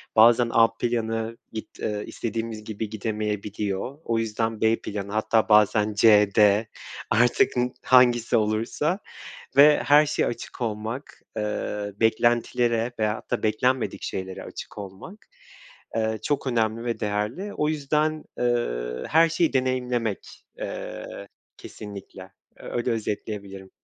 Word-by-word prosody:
bazen 115 +1 +6
A 115 0 +6
planı 115 -1 -1 0.2
git 110 - -8
eee, 105 -1 -2
istediğimiz 115 -1 -4
gibi 110 0 -5
gidemeyebiliyor. 105 +2 -3
O 115 -1 0
yüzden 110 0 -2
B 110 0 +4
planı 100 -1 -5
hatta 110 +1 +1
bazen 105 0 +4
C, 105 -1 +6
D, 105 +1 +5 0.4
artık 115 +3 +3 0.3
hangisi 120 -3 +4
olursa 115 - 0 0.6
ve 145 +2 +7
her 150 +1 +6
şeye 150 - 0
açık 120 - -6
olmak, 115 +4 -4 0.2
eee, 105 -1 -3
beklentilere 120 +1 +2
veyahut 110 0 -2
da - - -1
beklenmedik 125 +4 0
şeylere 95 0 -5
açık - - -9
olmak, 100 - -10 0.7
eee, 110 0 0
çok 145 -1 -1
önemli 115 -2 0
ve 120 -1 -2
değerli. 105 - -2
O 150 - 0
yüzden, 155 +1 0
eee, 60 - -1
her 165 +2 +5
şeyi 165 0 +1
deneyimlemek, 125 -4 -2
eee, 100 - -6 0.3
kesinlikle. 100 -2 -10 0.2
Öyle 120 - -3
özetleyebilirim. 100 -3 -4
110 Hz, 120 wpm, -25 LUFS, 105-120 Hz, 0.7 s, ve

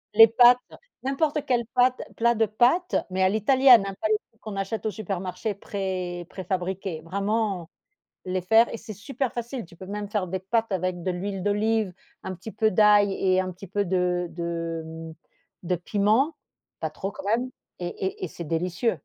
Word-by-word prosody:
Les 225 0 +10
pâtes, 245 +2 +6 0.4
n'importe 290 +2 0
quelle 240 -2 +1
pâte 250 +1 +3
plat 235 +1 +3
de 225 0 +3
pâtes, 250 - +2
mais 190 0 0
à 185 - +5
l'italienne, 245 +2 +6
hein, 195 - -5
pas 215 - 0
les 215 - +4
trucs 225 - -36
qu'on 215 -2 -7
achète 195 +2 -3
au 215 - +1
supermarché 195 0 -4
pré 185 -4 -4
préfabriqué, 185 -2 -3
vraiment, 195 0 -2 0.5
les 185 0 -1
faire 225 +6 +4
et 230 - -4
c'est 220 -1 -9
super 255 +4 -3
facile, 240 -2 -5
tu 170 - -17
peux 185 +2 -10
même 205 0 -4
faire 205 -4 -1
des 190 +1 -3
pâtes 225 +3 -1
avec 185 -1 -1
de 185 - -2
l'huile 195 +2 -4
d'olive, 210 0 +1 0.3
un 190 - -5
petit 190 +5 -9
peu 220 +1 +2
d'ail 205 0 +5
et 185 -1 +2
un 185 0 -1
petit 185 +2 -11
peu 205 +2 -1
de 180 -1 0
de, 165 -1 -4
mmh 160 0 -8 0.5
de 180 +1 0
piment, 215 - +1 0.4
pas 160 - -2
trop 195 +6 -5
quand - - -10
même, 235 +5 +1 0.3
et 175 - -3
et 190 +1 -4
et - - -1
c'est 170 - -8
délicieux. 170 +7 0
200 Hz, 190 wpm, -25 LUFS, 180-225 Hz, 0.5 s, Les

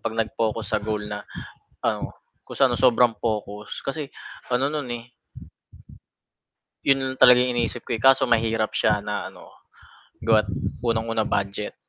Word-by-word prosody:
'pag 110 - -4
nag-focus 110 0 -1
sa - - -2
goal 105 0 -3
na 105 0 -5 0.6
ano, - - -2 0.3
kung - - -10
saan 130 -3 +4
sobrang 120 -2 +4
focus 105 -1 -3
kasi, 140 0 -4 0.4
ano 130 +3 +2
no'n, 145 -3 -3
eh - - -13 1.8
'Yon 135 -1 +2
lang - - -29
talaga 125 0 +8
iniisip 120 -1 -1
ko, 120 - 0
eh, - - -9
kaso 135 0 +6
mahirap 115 -1 +1
siya 105 -1 +2
na 105 0 -3
ano - - -15 0.8
gawa't 110 -1 +4 0.3
unang-una, 115 -1 0
budget. 100 +1 -2
115 Hz, 140 wpm, -24 LUFS, 110-125 Hz, 1.8 s, talaga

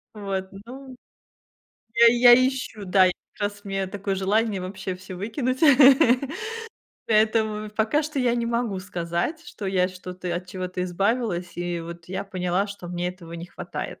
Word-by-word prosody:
Вот, 195 -2 -3 0.2
ну, 260 +2 -10 1.0
я 235 0 +7
и 230 - +6
я 240 0 +8
ищу, 255 -6 -5
да, 185 0 +5
я, - - +1 0.2
как - - -13
раз, 205 +1 -17
мне 195 -1 -2
такое 195 0 -3
желание 200 +1 +1
вообще 185 0 -5
всё 185 0 -9
выкинуть, 245 +6 -2 1.5
поэтому, 215 -1 +2
в 210 - -17
пока 220 +8 +1
что 305 -1 -4
я 245 -2 +2
не 235 -1 -1
могу 235 -4 -1
сказать, 180 - -3
что 215 - -7
я 185 -1 +2
что-то, 180 -1 -6
от 180 +1 -4
чего-то 180 0 -4
избавилась, 185 0 -1
и 175 -1 -2
вот 170 0 -9
я 190 +2 -4
поняла, 185 0 -1
что 200 -3 -9
мне 175 0 -2
этого 175 -2 -9
не 170 0 -6
хватает. - - -7
195 Hz, 165 wpm, -24 LUFS, 180-225 Hz, 1.5 s, я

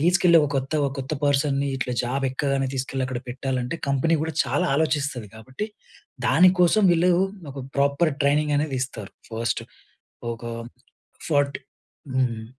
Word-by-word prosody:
తీసుకెళ్ళి 175 +1 +5
ఒక 150 - +1
కొత్త, 135 +2 -2 0.3
కొత్త 135 +2 -4
పర్సన్‌ని 140 0 +2
ఇట్లా 130 -1 -2
జాబ్ 135 +3 -1
ఎక్కగానే 135 0 0
తీసుకెళ్ళి 135 0 -2
అక్కడ 125 -1 -4
పెట్టాలంటే, 130 +2 -2
కంపెనీ 140 +5 +2
కూడా 160 0 -2
చాలా 135 +4 0
ఆలోచిస్తది 145 -7 0
కాబట్టి, 130 - -6 0.6
దానికోసం 180 +3 +5
వీళ్ళు 175 +1 +4 0.4
ఒక 140 - -9 0.2
ప్రాపర్ 140 +3 +2
ట్రైనింగ్ 145 +1 +2
అనేది 145 -2 -1
ఇస్తారు. 110 -7 -6 0.2
ఫస్ట్ 115 +1 -1 0.7
ఒక 115 0 -9 0.8
ఫార్ట్ 145 -2 +2 0.6
హ్మ్. 115 -4 0
140 Hz, 130 wpm, -24 LUFS, 130-155 Hz, 0.8 s, తీసుకెళ్ళి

